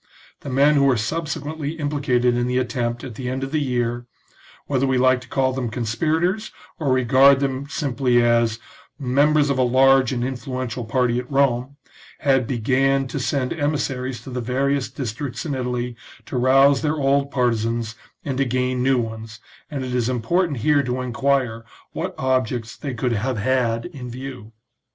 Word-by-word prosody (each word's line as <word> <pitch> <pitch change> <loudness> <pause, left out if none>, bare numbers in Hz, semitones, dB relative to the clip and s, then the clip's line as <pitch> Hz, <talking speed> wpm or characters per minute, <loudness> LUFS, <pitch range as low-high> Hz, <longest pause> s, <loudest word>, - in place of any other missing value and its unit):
The - - -8
men 140 +3 +4
who 140 -2 +4
were 130 -3 +3
subsequently 150 +4 -3
implicated 140 -6 +1
in 120 0 0
the 125 0 0
attempt 120 -1 -2
at 130 - -7
the 125 +2 -5
end 130 +1 -3
of 135 - -4
the 155 - 0
year, 120 -2 -1 0.6
whether 135 -1 0
we 130 -1 +2
like 130 0 +3
to 125 - -13
call 130 0 +1
them 130 -2 -2
conspirators 160 - -1 0.3
or 145 -5 0
regard 130 +2 +5
them 135 0 -2
simply 135 -5 +1
as 120 -1 +3 0.3
" - - -33
members 145 +2 +2
of 135 - -1
a - - +4
large 130 +1 +4
and 120 -2 -1
influential 130 -1 -4
party 125 0 +1
at 125 +2 -8
Rome," 135 -1 +1 0.5
had 135 -5 +2
began 135 +3 +1
to 145 - -3
send 130 0 -1
emissaries 135 -5 -2
to 130 - -9
the 125 0 -3
various 135 +3 0
districts 125 +3 -5
in 150 - -2
Italy 125 -2 -3 0.3
to - - -7
rouse 135 +2 +5
their 155 0 0
old 140 0 +2
partisans 115 -3 0 0.3
and 135 -2 -2
to 135 - +3
gain 125 0 0
new 130 +1 +3
ones, 110 -1 -5 0.3
and 140 -3 -4
it 125 - -4
is 125 -1 +1
important 145 +6 0
here 150 -2 +4
to 125 -1 -2
enquire 125 -2 0 0.3
what - - -4
objects 125 -3 -1
they 140 -4 -5
could 120 +1 -1
have 120 +3 -1
had 115 0 0
in 135 -8 -8
view. 125 -3 -8
130 Hz, 175 wpm, -22 LUFS, 120-140 Hz, 0.6 s, regard